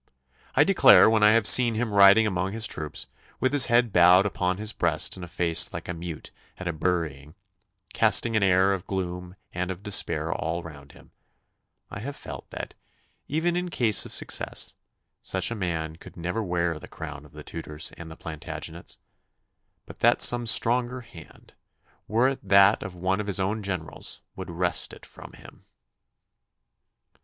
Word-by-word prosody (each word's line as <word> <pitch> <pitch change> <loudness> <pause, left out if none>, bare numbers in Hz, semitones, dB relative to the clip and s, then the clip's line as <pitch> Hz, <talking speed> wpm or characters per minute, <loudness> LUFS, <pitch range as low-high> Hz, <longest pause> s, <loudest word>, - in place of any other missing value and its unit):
I - - +6
declare - - +6
when 110 -1 +2
I 105 0 +6
have 115 -2 +2
seen 120 0 +5
him 110 -1 -2
riding 100 +2 +7
among 95 -1 -2
his 110 0 -2
troops, 75 -7 -4 0.3
with 130 - +1
his 145 -3 +6
head 120 -2 +2
bowed 90 +2 +6
upon 90 -2 -1
his 105 +1 -4
breast 80 -5 0
and 90 - -9
a - - -7
face 85 -1 0
like - - -7
a 90 - -3
mute 85 -2 -8 0.3
at 95 - -7
a 85 - -1
burying, 80 -3 -3 0.6
casting 115 +1 +2
an 110 - +2
air 95 0 +3
of 95 -1 -6
gloom 90 -1 -5 0.2
and 90 +1 -3
of 95 +1 -6
despair 100 -2 0
all 85 +2 -3
round 70 -3 -12
him, - - -19 0.8
I - - -6
have 140 +6 -6
felt - - -9
that, - - -7 0.5
even 165 +4 0
in 180 0 -2
case 115 - +3
of - - -10
success, - - -2 0.5
such 95 +3 0
a - - -2
man 80 -5 -4
could - - -14
never 90 +6 -3
wear 85 -4 -1
the - - -11
crown 75 -2 -8
of 75 - -18
the 75 0 -10
Tudors 75 -1 -5
and 85 -1 -10
the 80 - -11
Plantagenets, 80 +1 -7 0.9
but - - -13
that - - +4
some 120 -1 +2
stronger 125 +3 +2
hand, 85 -8 -16 0.5
were 115 +5 +2
it 135 - -4
that 100 +1 +6
of 95 -1 -7
one 95 +3 -1
of 105 - -7
his 100 -1 -1
own 100 +3 -1
generals, 90 -5 -5
would - - -8
wrest 90 +1 -1
it - - -13
from - - -13
him. - - -15
95 Hz, 175 wpm, -25 LUFS, 85-110 Hz, 0.9 s, riding